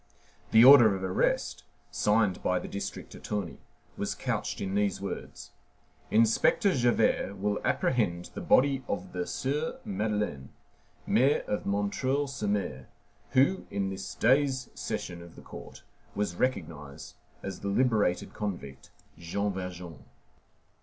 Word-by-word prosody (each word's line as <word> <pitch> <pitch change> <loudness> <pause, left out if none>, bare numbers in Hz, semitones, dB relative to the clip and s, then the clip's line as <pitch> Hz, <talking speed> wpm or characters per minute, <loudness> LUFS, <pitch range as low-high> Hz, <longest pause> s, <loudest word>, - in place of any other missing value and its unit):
The 115 +2 +7
order 120 -7 +9
of 95 - -5
arrest, 95 0 0 0.3
signed 105 -2 +2
by 90 - +1
the - - -5
district 100 0 -6
attorney, 100 -5 -4 0.4
was - - -2
couched - - -3
in 95 -1 -3
these 100 -1 +1
words: 100 0 -7 0.6
"Inspector 115 - +3
Javert 120 -5 +1
will 105 +1 -1
apprehend 90 -8 0
the - - -6
body 135 0 +3
of 95 -2 -4
the 90 -1 -3
Sieur 145 +3 -2
Madeleine, 105 -9 -2 0.6
mayor 135 +4 +3
of 105 - -3
M. 100 0 0
sur 140 +2 0 0.2
M., 90 -11 -2 0.5
who, 140 +9 +3
in 100 -1 -2
this 95 0 -6
day's 130 +1 +2
session 85 -1 -5
of 85 -1 -13
the - - -13
court, - - -11 0.3
was 100 -4 -1
recognized 80 - -3 0.3
as 95 -2 -5
the 100 - -5
liberated 105 -4 +1
convict, 90 -11 -6 0.3
Jean 100 +4 -2
Valjean." 90 -4 -7
100 Hz, 130 wpm, -29 LUFS, 90-120 Hz, 0.6 s, order